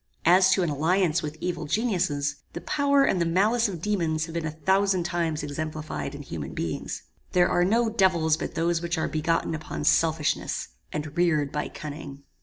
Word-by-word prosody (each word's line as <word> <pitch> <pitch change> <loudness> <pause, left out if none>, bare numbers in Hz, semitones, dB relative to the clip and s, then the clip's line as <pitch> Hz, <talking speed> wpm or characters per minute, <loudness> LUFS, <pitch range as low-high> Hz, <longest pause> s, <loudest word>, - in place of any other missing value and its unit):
As 185 +3 +6
to 185 - +2
an 165 - 0
alliance 165 +3 +2
with 155 +1 -5
evil 175 -3 -2
geniuses, 155 -8 0 0.2
the 170 - -5
power 280 - +2
and 190 -10 +2
the - - +4
malice 210 +7 +2
of 175 -4 -7
daemons 165 -7 0
have 165 - -9
been 165 -2 -2
a 155 0 -7
thousand 190 -1 +3
times 170 -3 -1
exemplified 155 -1 -4
in 145 - -8
human 80 - -6
beings. 80 -2 -4 0.3
There 180 -1 +5
are 175 - +2
no 225 +6 +3
devils 185 -8 +3
but 160 - -5
those 170 0 +1
which 170 0 -2
are 160 - 0
begotten 165 +1 0
upon 155 -1 -5
selfishness, 160 0 +1 0.2
and 150 0 -5
reared 155 -5 +2
by 150 - -2
cunning. 145 -2 -8
165 Hz, 185 wpm, -26 LUFS, 150-185 Hz, 0.3 s, As